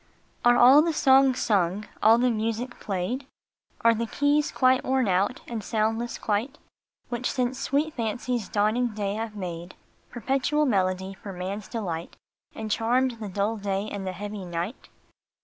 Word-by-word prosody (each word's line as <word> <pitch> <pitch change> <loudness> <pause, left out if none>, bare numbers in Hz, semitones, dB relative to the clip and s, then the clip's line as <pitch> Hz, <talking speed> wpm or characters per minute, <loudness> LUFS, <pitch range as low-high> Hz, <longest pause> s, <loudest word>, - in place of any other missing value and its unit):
RE 240 0 +6
all 260 +5 +8
the 330 +1 0
songs 265 -3 +4
sung, 195 0 +1 0.2
all 225 +2 +6
the 250 +1 +2
music 230 +3 -3
played? 205 +8 -3 0.5
Are 230 0 +5
the 230 +1 -2
keys 290 +4 +1
quite 255 0 +3
worn 260 -3 +1
out, 195 +7 +1
and 225 -3 -5
soundless 225 +3 -1
quite, 225 +8 -2 0.5
Which 240 0 -2
since 255 0 -1
sweet 295 +4 0
fancy 240 +2 -2
s 215 - -7
dawning 215 +2 +1
day 200 -2 -2
have 220 0 -4
made 175 -2 -6 0.3
Perpetual 270 +5 0
melody 190 -4 0
for 195 +1 -9
man 185 +2 -4
s 210 - -12
delight, 175 -8 -5 0.4
And 220 -1 -5
charmed 240 +2 +1
the 210 -2 -5
dull 205 +4 -1
day 200 0 -2
and 195 -2 -5
the 185 - -3
heavy 205 +1 -6
night? 175 +6 -5
225 Hz, 165 wpm, -26 LUFS, 200-250 Hz, 0.5 s, all